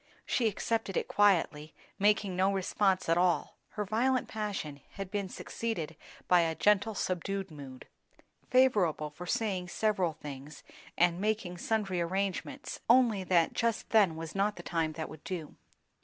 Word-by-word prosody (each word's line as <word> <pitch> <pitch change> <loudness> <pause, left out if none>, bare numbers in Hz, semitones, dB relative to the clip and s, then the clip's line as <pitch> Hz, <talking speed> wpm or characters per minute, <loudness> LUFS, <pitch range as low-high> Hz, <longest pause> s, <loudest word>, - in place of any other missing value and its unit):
She 235 - +1
accepted 220 -1 -1
it - - -1
quietly, 165 -7 +2 0.2
making 205 -2 +2
no 190 +2 +3
response 195 0 +1
at 165 +1 +3
all; 180 -1 +1 0.2
her 210 -1 -2
violent 245 +5 +1
passion 200 -10 -4
had 195 -1 -6
been 200 -3 -2
succeeded 180 -7 -4 0.3
by 180 - +6
a 165 -1 +1
gentle, 210 +3 +2
subdued 190 +1 -2
mood. 135 -4 -10 0.6
Favourable 195 - +3
for 175 +4 -9
saying 190 -3 -1
several 190 -3 0
things 145 -1 -9 0.3
and 175 +1 +3
making 205 -4 -1
sundry 195 -4 0
arrangements; 195 +10 -3
only 235 -5 +5
that 170 -3 +3
just 230 -1 -1
then 200 -7 +5
was 165 0 -6
not 200 +1 +1
the - - -9
time 165 -3 -1
that 160 0 -4
would 155 -1 -12
do. 170 -5 -5
190 Hz, 150 wpm, -31 LUFS, 165-210 Hz, 0.6 s, by